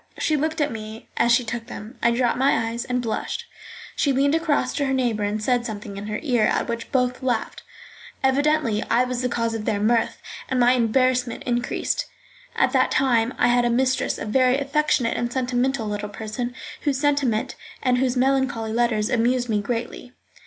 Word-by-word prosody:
She 310 - +1
looked 315 +2 -1
at 295 -1 +1
me 220 0 -8
as 235 - +3
she 240 +1 +4
took 230 +1 -5
them. 225 +1 -9
I 235 - +4
dropped 240 +1 +1
my 245 -4 +2
eyes 235 +1 -4
and 250 0 -1
blushed. 235 - -3 0.5
She 280 - +2
leaned 275 +2 +2
across 310 -5 +1
to 285 - 0
her 270 - 0
neighbour 240 -5 0
and 205 +1 -1
said 245 +1 +1
something 210 -3 -6
in 200 +1 -6
her 210 0 -3
ear, 245 -7 +2
at - - +1
which 235 0 -4
both 250 -2 0
laughed. 245 -4 -2 0.6
Evidently 270 -4 +2
I 235 +2 +4
was 250 -1 -2
the 250 - 0
cause 230 -1 -1
of 220 -1 -4
their 205 - 0
mirth, 225 +2 +1 0.3
and 260 - 0
my 245 0 +5
embarrassment 250 0 +1
increased. 245 -1 -1 0.5
At - - +2
that - - +3
time 245 -3 +2
I 245 - +3
had 245 0 +3
as 240 0 +1
mistress 260 +1 +1
a - - -5
very 255 +4 +3
affectionate 280 -3 +1
and 240 0 -2
sentimental 255 -1 0
little 210 0 -3
person, 225 +4 -5 0.3
whose 285 -3 0
sentiment 275 -5 +1 0.3
and 250 -1 +2
whose 255 -1 +1
melancholy 255 -4 +1
letters 230 -3 +1
amused 245 +1 +1
me 210 -2 +1
greatly. 240 +3 -4
245 Hz, 190 wpm, -23 LUFS, 230-265 Hz, 0.6 s, my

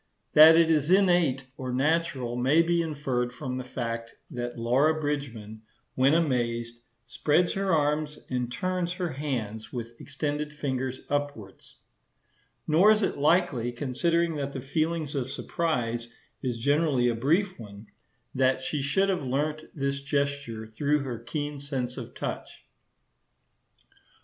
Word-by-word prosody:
That 160 +2 +9
it 165 -1 +5
is 150 -1 +2
innate 175 -8 +3
or 130 -1 -4
natural 135 -3 0
may 135 +7 +4
be 170 0 +2
inferred 135 -6 -2
from 130 0 -5
the - - -4
fact 115 -2 -5 0.2
that 120 0 -4
Laura 135 +7 +2
Bridgman, 120 -8 -4 0.3
when 135 +4 +4
amazed, 120 -6 0 0.3
"spreads 155 +6 +1
her 195 -1 0
arms 150 -1 +1
and 125 -1 -2
turns 180 +4 -1
her 180 -2 -3
hands 125 -7 -4
with 120 -2 -6
extended 150 +1 -3
fingers 130 -3 -3
upwards;" 145 -9 -4 0.9
nor 170 +7 +5
is 215 0 +4
it 190 - -1
likely, 145 -6 +2
considering 160 +6 0
that 140 -1 -3
the 135 - -4
feeling 160 +4 -1
of 130 -3 -2
surprise 120 -8 -2 0.3
is 125 -2 -2
generally 145 0 +2
a 120 - +2
brief 165 - +1
one, 105 -1 -10 0.5
that 130 0 +2
she 140 +2 -2
should 190 +8 +2
have 185 -4 0
learnt 150 +4 -2
this 140 -1 -1
gesture 140 -5 -2
through 145 +7 0
her 125 -4 -5
keen 145 +4 -4
sense 130 -3 -3
of - - -8
touch. - - -6
140 Hz, 140 wpm, -27 LUFS, 125-155 Hz, 0.9 s, That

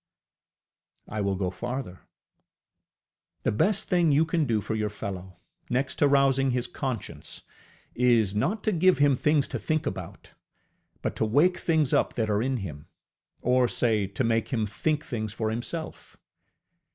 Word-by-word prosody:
I 105 0 -3
will 100 -1 0
go 95 -1 -2
farther. 120 -1 -6 1.4
The - - +1
best 190 - +1
thing 175 -3 +3
you 150 +3 +4
can 165 -1 0
do 115 -4 +1
for 105 - -4
your 105 -1 -1
fellow, 95 -3 -7 0.3
next 130 +2 -1
to 145 - +5
rousing 135 -1 +3
his 125 -1 0
conscience, 125 -3 -5 0.5
is 115 -5 +3
not 185 - -1
to 215 - +1
give 185 0 +4
him 145 -1 +4
things 150 +2 +2
to - - -3
think 155 -1 -1
about, 95 +1 -6 0.7
but - - -2
to - - +1
wake 150 +11 +3
things 160 -5 +1
up - - +2
that 110 -3 0
are 105 +1 +1
in 130 +2 0
him; 75 -4 -9 0.6
or 125 0 +3
say, 110 -5 +1
to 100 +6 -2
make 115 -1 +1
him 115 -4 -1
think 150 +9 -1
things 110 -3 -4
for 110 -1 -2
himself. 140 +8 -5
125 Hz, 160 wpm, -27 LUFS, 105-145 Hz, 1.4 s, to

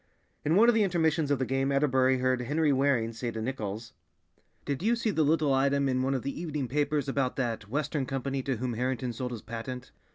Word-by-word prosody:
In 155 +3 +2
one 225 +4 +6
of 240 - +6
the 225 - +3
intermissions 160 -5 +1
of 145 - +2
the 130 - -1
game 135 +2 0
Atterbury 130 -2 +3
heard 130 0 +1
Henry 150 +3 +1
Waring 130 -4 +1
say 120 +1 -4
to 115 - -5
Nichols, 110 -2 -4 0.7
"Did 140 +1 -2
you 225 +5 +2
see 230 -2 0
the 160 - +1
little 150 -1 +3
item 140 +1 +2
in 130 -1 +1
one 135 +1 0
of 130 - -3
the 140 +4 -4
evening 150 -6 -3
papers 145 +2 0
about 135 -2 0
that 115 -5 -3
Western 145 +1 -1
Company 135 0 -2
to 130 -1 -2
whom 125 +1 -2
Harrington 125 +1 -2
sold 125 +2 -4
his 115 -4 -6
patent?" 125 +2 -6
135 Hz, 220 wpm, -29 LUFS, 125-150 Hz, 0.7 s, one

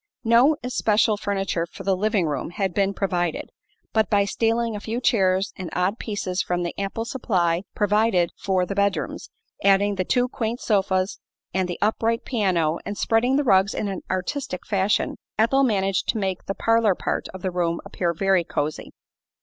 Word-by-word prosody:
No 240 +6 +5
especial 220 -3 +2
furniture 195 -4 -2
for - - -10
the 195 0 +2
living 205 -1 +1
room 150 0 -2
had 190 +1 -2
been 200 +1 +2
provided, 180 -4 -2 0.4
but 220 -4 +2
by 200 -1 +3
stealing 225 +2 0
a - - -4
few 225 +3 -3
chairs 190 -5 +2
and 185 -3 -5
odd 185 +5 0
pieces 190 -4 -2
from 175 0 -1
the 175 - -3
ample 200 +3 -3
supply 180 -9 0
provided 205 -4 +2
for 185 -2 0
the 195 - -4
bedrooms, 195 -7 -1 0.3
adding 200 +1 +4
the 190 -2 -1
two 245 +6 +1
quaint 235 -1 -3
sofas 190 -2 0 0.3
and 185 -1 0
the 175 - -3
upright 225 +2 0
piano 180 -9 +1
and 205 - -5
spreading 245 +4 +2
the 290 - +2
rugs 195 -4 +3
in 210 - -2
an 195 -2 -4
artistic 185 +2 -3
fashion, 200 0 0 0.2
Ethel 230 +6 +3
managed 195 -6 +1
to - - +1
make 190 -3 -2
the 195 - -2
"parlor 225 -4 +3
part" - - -2
of 190 - -10
the 185 - -1
room 170 -1 0
appear 175 -2 -1
very 190 +1 +2
cosy. 150 -1 -3
195 Hz, 175 wpm, -24 LUFS, 185-220 Hz, 0.4 s, No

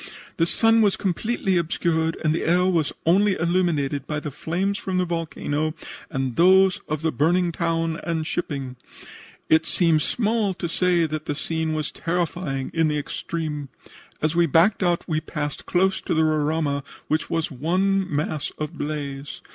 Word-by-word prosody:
The 165 - +2
sun 225 +4 +4
was 205 -3 +3
completely 195 0 0
obscured, 165 -1 0
and 155 -1 +2
the 165 - -1
air 180 +2 +3
was 170 -5 +1
only 195 +4 +4
illuminated 160 -5 0
by 150 -1 -2
the 150 0 -5
flames 190 +8 -2
from 190 -1 -2
the 180 - +2
volcano 155 -2 -2 0.3
and 135 -3 -2
those 190 +3 +5
of 155 0 -3
the 160 - +2
burning 170 +6 +2
town 165 -1 -1
and 165 -2 -2
shipping. 140 -6 -3 0.7
It 160 +1 +4
seems 165 -4 +3
small 215 -4 0
to 175 - -3
say 175 0 +2
that 155 0 -4
the 145 - -1
scene 160 +1 -2
was 155 -1 -2
terrifying 165 -5 -2
in 165 -1 +2
the 150 -1 0
extreme. 150 -1 -4 0.5
As 155 +1 +1
we 170 -1 +4
backed 170 +8 +4
out 175 -2 +1
we 155 -2 0
passed 145 -2 -5
close 190 +1 +2
to - - -1
the 160 - +3
Roraima, 155 -2 +1 0.3
which 155 +1 0
was 165 0 -1
one 185 +8 +1
mass 150 0 -2
of 150 -1 -4
blaze. 145 -2 -4
165 Hz, 165 wpm, -24 LUFS, 150-180 Hz, 0.7 s, those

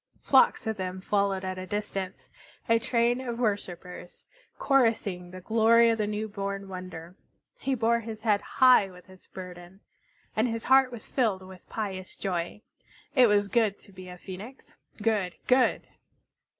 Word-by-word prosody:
Flocks 265 -2 +4
of 220 -1 -2
them 185 0 -4
followed 195 -1 0
at 185 0 -4
a 185 - -7
distance, 195 -2 -4 0.4
a 230 -1 +4
train 240 +1 +1
of 240 -3 -4
worshipers, 180 -6 -4 0.3
chorusing 220 -9 +1
the 185 +1 -10
glory 230 +3 +5
of 225 - -1
the 210 - 0
new 210 +1 -2
born 200 -1 -4
wonder. 180 -2 -8 0.4
He 270 - -1
bore 235 0 +2
his 220 -1 -8
head 210 -3 +2
high 250 -6 +5
with 180 -1 -15
its 185 - -18
burden, 180 +1 -10 0.5
and 220 +3 +2
his 230 -1 -3
heart 265 -1 +5
was 235 -3 -7
filled 215 -8 0
with 185 -1 -14
pious 190 -4 -5
joy. 180 +2 -3 0.5
It 255 -4 +6
was 205 -1 +3
good 215 -1 +1
to 200 - -17
be 185 -1 -11
a 180 - -9
Phoenix, 200 +9 -10 0.3
good, 205 -5 +1
good! 255 0 +3
205 Hz, 160 wpm, -28 LUFS, 185-230 Hz, 0.5 s, It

